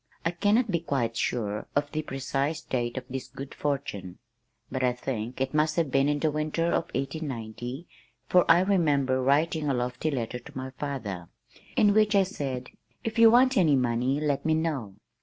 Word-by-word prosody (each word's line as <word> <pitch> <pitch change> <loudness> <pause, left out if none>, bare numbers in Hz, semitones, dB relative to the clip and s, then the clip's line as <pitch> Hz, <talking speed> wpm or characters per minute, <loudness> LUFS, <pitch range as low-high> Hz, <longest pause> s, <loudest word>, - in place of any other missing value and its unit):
I 165 - +2
cannot 205 +6 +2
be 170 - +1
quite 130 -8 -1
sure 105 -3 -2
of 145 0 0
the 155 - -1
precise 135 +2 -2
date 120 -1 -2
of 130 - -4
this 130 -1 -5
good 135 +1 -8
fortune, 135 -11 -3 0.5
but 130 - -2
I 125 -1 +3
think 125 -1 -4
it 135 +1 -1
must 155 +1 +2
have 165 -5 0
been 135 +2 +3
in 145 - +1
the 155 +1 +1
winter 155 +2 -1
of 170 - +1
1890 130 -1 -4 0.4
for 180 -1 +5
I 170 +2 +7
remember 145 -9 +2
writing 150 +3 +2
a 135 - +1
lofty 125 +5 -1
letter 125 -3 -3
to 120 - -12
my 130 0 -5
father, 125 - -5 0.5
in 205 -1 +5
which 215 0 +4
I 195 - +6
said, 135 - -4 0.3
"If 225 0 -2
you 230 0 +9
want 255 +2 +5
any 160 -6 +5
money, 125 +2 +1
let 145 -2 0
me 160 0 +2
know." 145 -11 -2
140 Hz, 185 wpm, -27 LUFS, 125-160 Hz, 0.5 s, you